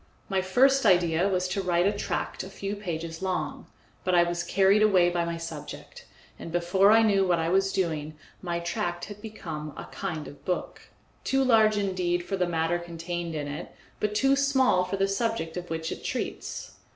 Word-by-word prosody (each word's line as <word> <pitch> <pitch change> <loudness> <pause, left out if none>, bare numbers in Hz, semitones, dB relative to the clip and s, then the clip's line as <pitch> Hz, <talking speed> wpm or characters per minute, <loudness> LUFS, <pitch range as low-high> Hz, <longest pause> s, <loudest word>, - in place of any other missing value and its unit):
My 190 -1 +1
first 265 +9 +4
idea 175 -2 +3
was 185 -1 0
to 195 +1 -1
write 175 -1 +2
a 200 - +4
tract 205 - -3
a 190 - -7
few 200 +1 -4
pages 165 -4 -5
long, 180 -6 -3 0.4
but 185 -1 +1
I 175 - +6
was 175 0 -1
carried 195 +4 +3
away 185 -5 +5
by 175 -1 0
my 170 0 -3
subject, 165 -3 -8 0.3
and 165 - -7
before 175 +3 +3
I 225 +1 +6
knew 200 -3 +4
what 180 -2 +2
I 165 0 0
was 195 +2 +2
doing 155 -4 -2 0.2
my 175 -2 -2
tract 175 0 -3
had 205 0 -10
become 160 -9 -6
a - - -6
kind 160 -6 -4
of 145 - -13
book, 180 - -4 0.3
too 270 0 +2
large 220 -4 +4
indeed 180 -3 0
for 195 - -2
the 180 -2 0
matter 165 0 0
contained 170 0 -5
in 145 -1 -3
it, 145 +4 -7 0.2
but 210 0 -1
too 270 +5 +4
small 265 -9 +3
for 190 +2 -3
the 195 0 +2
subject 195 -5 -1
of 180 -1 -6
which 160 0 -3
it - - -6
treats. - - -4
180 Hz, 195 wpm, -27 LUFS, 170-200 Hz, 0.4 s, I